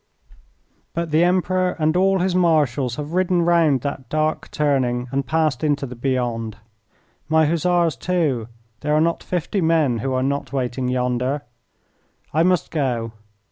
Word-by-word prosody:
But 170 -1 -2
the 155 +3 +4
Emperor 185 0 +1
and 155 0 +1
all 190 +1 +3
his 185 0 +1
Marshals 145 -8 +2
have 150 +2 -6
ridden 180 -1 +2
round 165 -6 +3
that 135 -1 -5
dark 155 0 -1
turning 130 -4 0
and 135 0 -1
passed 155 -5 0
into 145 -2 +1
the 125 -1 -8
beyond. 120 -3 -2 0.7
My 160 0 +4
Hussars, 170 +1 +1
too 150 -11 0 0.3
there 150 0 0
are - - +4
not 165 +1 +1
fifty 180 +2 -2
men 160 -8 +2
who 135 +4 -2
are 130 0 0
not 140 +1 -2
waiting 130 -1 -2
yonder. 125 +2 -1 0.9
I 155 - +3
must 180 +1 +2
go. 125 -7 -1
150 Hz, 150 wpm, -21 LUFS, 130-170 Hz, 0.9 s, the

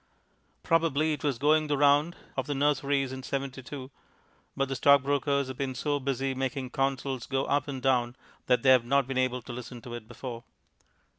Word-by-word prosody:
Probably 160 -2 +2
it 150 - -6
was 140 -5 0
going 155 +3 +3
the 145 -1 0
round 145 +4 +4 0.2
of - - -2
the 145 - -2
nurseries 140 -1 +1
in 130 0 -6
72, 135 0 -5 0.7
but 135 - +1
the 135 - -3
stockbrokers 140 +1 +3
have 130 -1 -7
been 135 -2 -2
so 145 +2 -1
busy 135 0 -1
making 130 0 -3
Consols 135 -1 -1
go 135 0 0
up 145 0 0
and 135 -3 -5
down 125 -2 +2 0.3
that 125 -2 +3
they 130 - +6
have 130 -2 +6
not 140 +3 +2
been 130 0 -2
able 125 -1 0
to 120 - -8
listen 125 0 -8
to 120 -3 -8
it 120 -2 -7
before. 120 -2 -7
135 Hz, 190 wpm, -28 LUFS, 130-145 Hz, 0.7 s, they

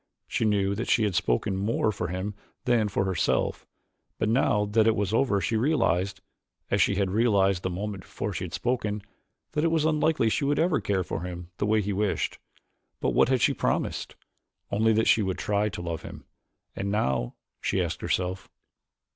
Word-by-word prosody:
She - - 0
knew 100 -2 +2
that 115 +4 -3
she 115 - +4
had 105 -3 +1
spoken 85 - +1
more 105 +2 +1
for 90 - -3
him 95 +4 -3 0.3
than 120 -4 +3
for 100 -1 0
herself 95 -4 0 0.5
but 110 - 0
now 110 -3 +2
that 110 +2 +3
it 110 - +4
was 100 0 -1
over 115 -4 +2
she 100 +5 -1
realized, 100 - +1 0.5
as - - +3
she 100 - +3
had 95 -1 0
realized 100 -4 +3
the 95 - -2
moment 100 +2 -4
before 105 +2 -5
she 85 - -4
had 85 - -8
spoken, 105 -1 -1 0.5
that 150 - 0
it - - +4
was 160 -2 +1
unlikely 155 -6 +2
she - - 0
would 145 +1 +1
ever 170 -2 +2
care 95 -2 0
for 80 - -4
him 90 0 -7
the 105 - +1
way 110 0 +3
he 100 +1 -2
wished. 100 0 -1 0.6
But - - 0
what - - +4
had 130 -2 +2
she - - +4
promised? - - -2 0.6
Only 110 +2 +3
that 110 +1 +2
she 110 - +5
would 95 -2 -1
try 105 +2 0
to 90 - -6
love 85 -2 -3
him. - - -10 0.5
"And 100 - -2
now?" 65 - 0 0.3
she - - 0
asked - - -2
herself. 90 +1 -2
105 Hz, 195 wpm, -27 LUFS, 95-110 Hz, 0.6 s, she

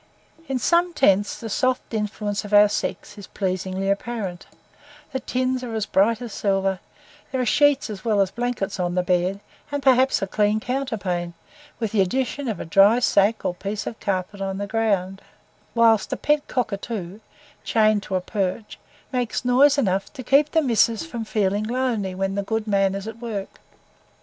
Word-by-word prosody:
In 270 - -1
some 340 +6 +2
tents 200 -6 +2
the 230 - -6
soft 255 +3 -1
influence 210 -1 -2
of 205 0 0
our 205 0 +7
sex 210 0 -4
is 200 - -10
pleasingly 190 0 -3
apparent: 200 -3 -3 0.6
the 265 - -2
tins 255 0 -1
are 235 -2 -5
as 215 -2 -1
bright 220 +5 +2
as 235 - -7
silver, 195 -2 0 0.5
there 260 - -1
are 250 - +1
sheets 290 +4 +3
as 205 -4 -7
well 215 -3 +1
as 195 -1 +2
blankets 235 -5 -3
on 175 0 -1
the 180 - +1
beds, 180 +2 0 0.3
and 285 -1 -3
perhaps 260 0 +4
a - - -1
clean 210 +2 +1
counterpane, 200 -10 -3 0.4
with 225 -4 -2
the 210 - +3
addition 260 +7 -1
of 220 - -3
a - - -5
dry 195 +7 +5
sack 215 -3 +2
or - - 0
piece 200 +3 -5
of 225 - -6
carpet 195 +1 -3
on 195 0 -2
the 205 - -3
ground; 200 -3 -1 0.5
whilst 225 -3 +4
a - - -1
pet 295 0 +1
cockatoo, 205 -5 -3 0.4
chained 215 -2 +3
to 190 -1 -4
a 185 - +1
perch, 195 +2 -3 0.3
makes 245 -1 -1
noise 270 +3 +5
enough 195 -7 0
to 265 -3 -8
keep 280 +4 +4
the 320 0 +2
"missus" 230 -1 +2
from 240 -8 -5
feeling 205 -1 0
lonely 230 -6 -1
when 195 +1 -1
the 200 - -1
good 220 +2 -2
man 195 -2 +1
is 195 +2 -5
at 225 +1 -7
work. 215 -5 -6
210 Hz, 180 wpm, -23 LUFS, 195-245 Hz, 0.6 s, our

